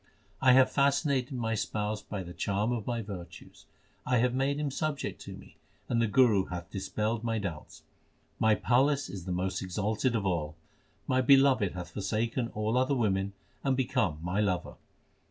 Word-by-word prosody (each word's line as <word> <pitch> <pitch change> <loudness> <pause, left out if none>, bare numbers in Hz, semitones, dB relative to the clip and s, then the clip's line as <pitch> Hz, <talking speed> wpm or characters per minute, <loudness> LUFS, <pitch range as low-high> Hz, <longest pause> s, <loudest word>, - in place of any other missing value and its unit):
I 130 -1 +6
have 130 0 +5
fascinated 140 -2 +1
my 115 -2 -1
Spouse 105 0 -2
by 100 -3 -5
the 90 0 -9
charm 100 +5 -1
of 115 -4 -3
my 120 -2 -1
virtues: 95 -4 -10 0.4
I 125 0 +1
have 125 +1 +2
made 135 +2 0
Him 150 -2 -1
subject 150 0 -3
to - - -7
me - - -16 0.3
and 115 -1 +1
the 115 - +2
Guru 105 -3 +4
hath 85 -2 -7
dis 95 -1 -5
pelled 110 +1 -1
my 115 -1 0
doubts. 90 -7 -6 0.6
My 110 -1 +4
palace 135 +5 +2
is 95 -4 -7
the 95 - -4
most 90 +1 -1
exalted 105 +6 -1
of 105 -3 -1
all. 80 -5 -1 0.5
My 130 0 +2
Beloved 135 -6 +5
hath 90 -1 -7
forsaken 110 +5 -1
all 110 +3 +1
other 130 +2 +1
women 100 -4 0 0.3
and 135 -2 +1
become 120 - 0
my 90 +4 -1
lover. 95 -4 0
110 Hz, 175 wpm, -30 LUFS, 95-130 Hz, 0.6 s, I